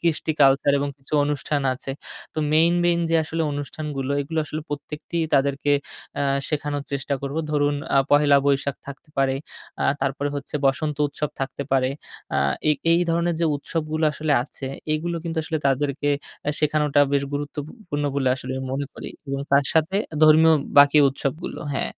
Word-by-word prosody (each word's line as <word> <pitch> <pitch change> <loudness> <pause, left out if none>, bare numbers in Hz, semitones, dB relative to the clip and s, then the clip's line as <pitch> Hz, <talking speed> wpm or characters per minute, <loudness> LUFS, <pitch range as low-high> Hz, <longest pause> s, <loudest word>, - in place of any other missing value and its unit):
কৃষ্টি 160 -2 0
কালচার 140 +1 +5
এবং 145 - -1
কিছু 135 - -12
অনুষ্ঠান 145 0 -1
আছে। 135 +1 -6 0.4
তো - - -3
মেইন, 165 +2 +5
মেইন 170 -1 +3
যে 165 - +2
আসলে 160 +1 -2
অনুষ্ঠানগুলো 145 -1 -4
এগুলো 160 +3 -4
আসলে 155 +1 -4
প্রত্যেকটি 150 +3 -5 0.2
তাদেরকে 140 +1 +2 0.4
অ্যা - - 0 0.2
শেখানোর 145 -2 -2
চেষ্টা 140 +1 -1
করবো। 140 +3 -3
ধরুন 145 -1 +2 0.2
আ - - +7
পহেলা 145 -1 +5
বৈশাখ 140 0 +1
থাকতে 140 +3 -10
পারে, 135 -1 +2 0.5
আ - - +1 0.2
তারপরে 135 +1 -1
হচ্ছে 140 +1 -7
বসন্ত 145 +2 0
উৎসব 150 +1 -4
থাকতে 135 +1 -3
পারে। 130 -1 +3 0.4
আ - - +2 0.3
এই, 150 - +5 0.2
এই 170 - +4
ধরনের 170 0 +1
যে 165 - +3
উৎসবগুলো 155 +1 -2
আসলে 155 0 -1
আছে, 135 0 -8 0.3
এগুলো 170 +2 -2
কিন্তু 165 -1 -4
আসলে 160 0 -2
তাদেরকে 140 +1 0 0.3
অ্যা 150 - -1
শেখানোটা 150 -1 +2
বেশ 140 - +2
গুরুত্বপু 145 +1 -4 0.2
পূর্ণ 145 -2 -2
বলে 135 -2 +2
আসলে 130 0 -5
আমি 130 - -5
মনে 140 +1 -2
করি - - -7 0.2
এবং 135 0 -3
তার 140 0 +5
সাথে 160 +4 +2 0.3
ধর্মীয় 160 +1 +7 0.2
বাকি 145 +1 +7
উৎসবগুলো 140 +5 -4
হ্যাঁ। - - -1
145 Hz, 170 wpm, -23 LUFS, 140-155 Hz, 0.5 s, আ